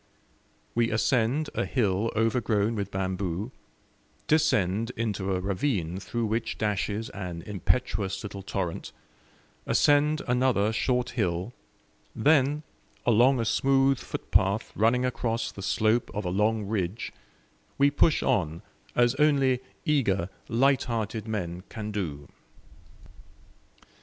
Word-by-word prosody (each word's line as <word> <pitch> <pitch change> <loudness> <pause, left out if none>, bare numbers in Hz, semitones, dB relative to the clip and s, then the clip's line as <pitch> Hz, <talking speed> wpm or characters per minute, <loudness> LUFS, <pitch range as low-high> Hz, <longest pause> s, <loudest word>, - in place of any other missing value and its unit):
We 115 0 +2
ascend 125 +6 +1
a - - 0
hill 110 -3 0
overgrown 110 -1 +1
with 100 -3 -3
bamboo, 95 +2 -3 0.7
descend 115 - +2
into 100 -4 -1
a - - -1
ravine 95 - -1
through 115 +3 -3
which 115 +2 -2
dashes 105 +1 -1
an 90 -4 -6
impetuous 105 0 -1
little 100 -1 -6
torrent, 95 -3 -4 0.7
ascend 150 +1 +3
another 125 -4 +2
short 125 +2 0
hill, 95 -2 -1 0.6
then, 145 +3 +3 0.4
along 120 +3 +4
a 115 - 0
smooth 135 +2 +3
footpath 100 +4 0
running 120 +4 +3
across 115 -2 -1
the 100 - -9
slope 110 +4 +1
of 105 -1 -3
a - - 0
long 105 +2 +1
ridge, 100 0 -2 0.7
we 140 +1 +4
push 150 +2 +3
on 85 - 0 0.3
as 120 0 +4
only 135 -4 +3 0.2
eager, 100 - +1 0.2
lighthearted 115 -3 +1
men 90 -5 -3
can 105 -1 -5
do. 75 -9 -4
110 Hz, 110 wpm, -27 LUFS, 100-125 Hz, 0.7 s, along